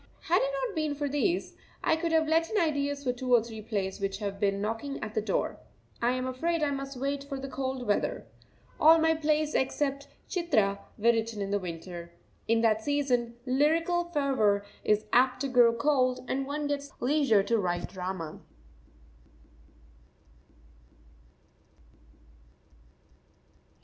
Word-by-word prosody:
Had -, -, +2 dB
it -, -, +1 dB, 0.2 s
not 445 Hz, -5 st, -5 dB
been 310 Hz, -2 st, -1 dB
for 290 Hz, 0 st, -2 dB
these, 290 Hz, +6 st, 0 dB, 0.3 s
I -, -, +3 dB
could 330 Hz, +1 st, -2 dB
have 320 Hz, -1 st, +3 dB
let 325 Hz, +1 st, +2 dB
in 435 Hz, -, +1 dB
ideas 285 Hz, -4 st, 0 dB
for 250 Hz, -2 st, 0 dB
two 250 Hz, +1 st, -4 dB
or 230 Hz, -, +4 dB
three 225 Hz, -2 st, -8 dB
plays 205 Hz, -3 st, -3 dB
which 195 Hz, 0 st, -1 dB
have 200 Hz, -2 st, -4 dB
been 200 Hz, -1 st, +1 dB
knocking 225 Hz, +7 st, -3 dB
at 215 Hz, 0 st, -5 dB
the 220 Hz, -, 0 dB
door. 215 Hz, -, -1 dB, 0.4 s
I 240 Hz, +1 st, +2 dB
am 255 Hz, 0 st, -2 dB
afraid 315 Hz, +6 st, -1 dB
I 290 Hz, -, +1 dB
must 275 Hz, -1 st, -5 dB
wait 275 Hz, +2 st, -2 dB
for 280 Hz, -1 st, -6 dB
the 275 Hz, -, -5 dB
cold 265 Hz, -1 st, -3 dB
weather. 205 Hz, -, 0 dB, 0.5 s
All 320 Hz, +2 st, +8 dB
my 320 Hz, 0 st, +3 dB
plays 310 Hz, -1 st, 0 dB
except 275 Hz, +1 st, -1 dB, 0.2 s
"Chitra" 220 Hz, -, +1 dB, 0.2 s
were 205 Hz, -, -13 dB
written 225 Hz, -1 st, -2 dB
in 200 Hz, 0 st, -3 dB
the 205 Hz, -, +1 dB
winter. 170 Hz, -1 st, -7 dB, 0.3 s
In 230 Hz, 0 st, +3 dB
that 220 Hz, -1 st, +3 dB
season 250 Hz, -3 st, 0 dB
lyrical 325 Hz, +6 st, +2 dB
fervour 265 Hz, -11 st, +1 dB, 0.2 s
is 210 Hz, 0 st, +2 dB
apt 255 Hz, +1 st, +4 dB
to 280 Hz, -, 0 dB
grow 245 Hz, -3 st, +5 dB
cold, 255 Hz, 0 st, +1 dB
and 270 Hz, +1 st, -2 dB
one 295 Hz, +1 st, -3 dB
gets 285 Hz, -1 st, -2 dB
the 270 Hz, -, -8 dB
leisure 270 Hz, -8 st, +3 dB
to 230 Hz, +2 st, +1 dB
write 175 Hz, -3 st, -1 dB
drama. 180 Hz, -4 st, -5 dB
260 Hz, 155 wpm, -29 LUFS, 215-290 Hz, 0.5 s, All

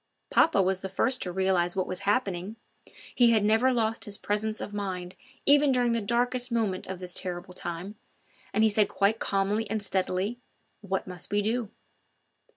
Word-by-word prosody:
Papa 200 Hz, -12 st, +4 dB
was 190 Hz, 0 st, 0 dB
the 190 Hz, -, -5 dB
first 255 Hz, +7 st, 0 dB
to 180 Hz, -, -3 dB
realise 185 Hz, -1 st, +2 dB
what 185 Hz, -1 st, 0 dB
was 185 Hz, -, -4 dB
happening; 200 Hz, -3 st, -1 dB, 0.6 s
he 240 Hz, -2 st, +5 dB
had 220 Hz, -3 st, +3 dB
never 225 Hz, +5 st, +4 dB
lost 225 Hz, -2 st, 0 dB
his 205 Hz, -1 st, -3 dB
presence 215 Hz, +1 st, -1 dB
of 205 Hz, -, -6 dB
mind 185 Hz, -3 st, -4 dB, 0.3 s
even 285 Hz, 0 st, +5 dB
during 245 Hz, -2 st, +2 dB
the 230 Hz, -1 st, 0 dB
darkest 245 Hz, +3 st, 0 dB
moment 215 Hz, -5 st, -1 dB
of 190 Hz, -, -5 dB
this 180 Hz, 0 st, -4 dB
terrible 180 Hz, 0 st, -4 dB
time, 175 Hz, +3 st, -5 dB, 0.6 s
and 215 Hz, -, +2 dB
he 220 Hz, -, +5 dB
said 210 Hz, 0 st, +2 dB
quite 205 Hz, +2 st, +1 dB
calmly 200 Hz, +3 st, 0 dB
and 215 Hz, -1 st, -2 dB
steadily 195 Hz, +4 st, -1 dB, 0.4 s
now: 200 Hz, -, -13 dB
"What 190 Hz, 0 st, -1 dB
must 180 Hz, -2 st, -5 dB
we 205 Hz, 0 st, +2 dB
do?" 225 Hz, 0 st, -1 dB
205 Hz, 180 wpm, -28 LUFS, 185-225 Hz, 0.6 s, he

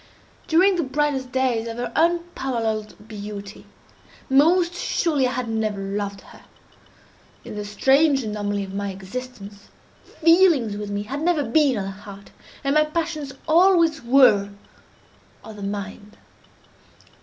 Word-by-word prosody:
During 365 Hz, +4 st, +4 dB
the 340 Hz, -, 0 dB
brightest 270 Hz, -2 st, -1 dB
days 250 Hz, -3 st, 0 dB
of 230 Hz, 0 st, -6 dB
her 245 Hz, -, -4 dB
unparalleled 250 Hz, -12 st, -1 dB
beauty, 205 Hz, -1 st, -9 dB, 0.6 s
most 340 Hz, +6 st, +4 dB
surely 310 Hz, -6 st, 0 dB
I 250 Hz, -, -3 dB
had 250 Hz, 0 st, -3 dB
never 220 Hz, -2 st, -2 dB
loved 200 Hz, 0 st, -4 dB
her. -, -, -16 dB, 1.0 s
In -, -, -8 dB
the 210 Hz, -, -4 dB
strange 270 Hz, +7 st, +2 dB
anomaly 205 Hz, -2 st, -3 dB
of 190 Hz, -1 st, -8 dB
my 200 Hz, 0 st, -3 dB
existence, 200 Hz, +1 st, -9 dB, 0.4 s
feelings 330 Hz, -, +3 dB
with 205 Hz, 0 st, -6 dB
me, 205 Hz, 0 st, -3 dB
had 270 Hz, +7 st, -5 dB
never 325 Hz, -3 st, +1 dB
been 270 Hz, 0 st, +2 dB
of 200 Hz, -, -2 dB
the 195 Hz, -, -5 dB
heart, 200 Hz, 0 st, -12 dB, 0.3 s
and 275 Hz, 0 st, +1 dB
my 305 Hz, 0 st, +4 dB
passions 305 Hz, -3 st, -4 dB
always 335 Hz, -1 st, +4 dB
were 235 Hz, -5 st, +4 dB, 0.9 s
of 220 Hz, -, -10 dB
the -, -, -9 dB
mind. 205 Hz, +1 st, -6 dB
245 Hz, 135 wpm, -22 LUFS, 205-305 Hz, 1.0 s, During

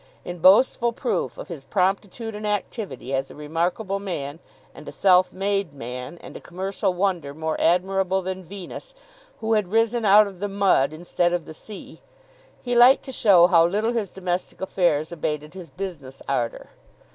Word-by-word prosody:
In 175 Hz, 0 st, -6 dB
boastful 235 Hz, +6 st, +5 dB
proof 250 Hz, +2 st, -2 dB
of -, -, -8 dB
his 165 Hz, -7 st, -8 dB
promptitude 195 Hz, -, -1 dB
and 210 Hz, 0 st, -5 dB
activity, 205 Hz, -, -4 dB
as 135 Hz, 0 st, -1 dB
a -, -, -12 dB
remarkable 175 Hz, +7 st, -2 dB
man, 160 Hz, -6 st, -5 dB, 0.3 s
and 150 Hz, -, -13 dB
a -, -, -8 dB
self 185 Hz, -1 st, +4 dB
made 195 Hz, -5 st, -2 dB
man, 125 Hz, +4 st, -6 dB
and -, -, -11 dB
a -, -, -8 dB
commercial 190 Hz, +2 st, -2 dB
wonder 175 Hz, -7 st, -1 dB
more 160 Hz, 0 st, -2 dB
admirable 190 Hz, +2 st, +1 dB
than 190 Hz, 0 st, -5 dB
Venus, 200 Hz, -, -9 dB, 0.5 s
who 225 Hz, 0 st, 0 dB
had 210 Hz, -3 st, +1 dB
risen 225 Hz, +1 st, +2 dB
out 210 Hz, +1 st, +7 dB
of 195 Hz, -3 st, -9 dB
the 205 Hz, +1 st, -3 dB
mud 195 Hz, -9 st, +2 dB
instead 175 Hz, +2 st, -1 dB
of 175 Hz, -2 st, -2 dB
the -, -, -9 dB
sea, 205 Hz, +6 st, -11 dB, 0.6 s
he 245 Hz, -, -2 dB
liked 245 Hz, +3 st, +6 dB
to 265 Hz, -, -6 dB
show 195 Hz, -8 st, +5 dB
how 175 Hz, -2 st, +5 dB
little 210 Hz, +7 st, 0 dB
his 220 Hz, -5 st, -2 dB
domestic 180 Hz, -1 st, -4 dB
affairs 170 Hz, -5 st, 0 dB
abated 150 Hz, -2 st, -4 dB
his 185 Hz, -3 st, -10 dB
business 150 Hz, -9 st, -8 dB
ardour. 120 Hz, -4 st, -2 dB
185 Hz, 170 wpm, -23 LUFS, 160-205 Hz, 0.6 s, out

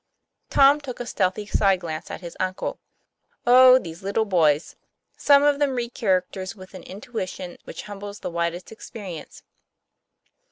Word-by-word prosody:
Tom 280 Hz, +2 st, +5 dB
took 260 Hz, -4 st, -7 dB
a 245 Hz, -, -4 dB
stealthy 195 Hz, -1 st, -1 dB
side 195 Hz, -2 st, +2 dB
glance 160 Hz, -2 st, -6 dB
at -, -, -7 dB
his 170 Hz, -2 st, -9 dB
uncle. 185 Hz, 0 st, -3 dB, 0.7 s
Oh, 255 Hz, +1 st, +8 dB
these 170 Hz, -7 st, -7 dB
little 200 Hz, +3 st, 0 dB
boys! 160 Hz, -6 st, +2 dB, 0.4 s
Some 285 Hz, 0 st, +5 dB
of 290 Hz, -1 st, +3 dB
them 280 Hz, -3 st, +1 dB
read 240 Hz, -1 st, -3 dB
characters 185 Hz, 0 st, -1 dB
with 185 Hz, -1 st, -13 dB
an 185 Hz, -, -9 dB
intuition 190 Hz, -5 st, -7 dB
which -, -, -8 dB
humbles 205 Hz, 0 st, -8 dB
the -, -, -4 dB
widest 170 Hz, +1 st, -3 dB
experience. 200 Hz, -7 st, -9 dB
200 Hz, 150 wpm, -24 LUFS, 180-245 Hz, 0.7 s, Oh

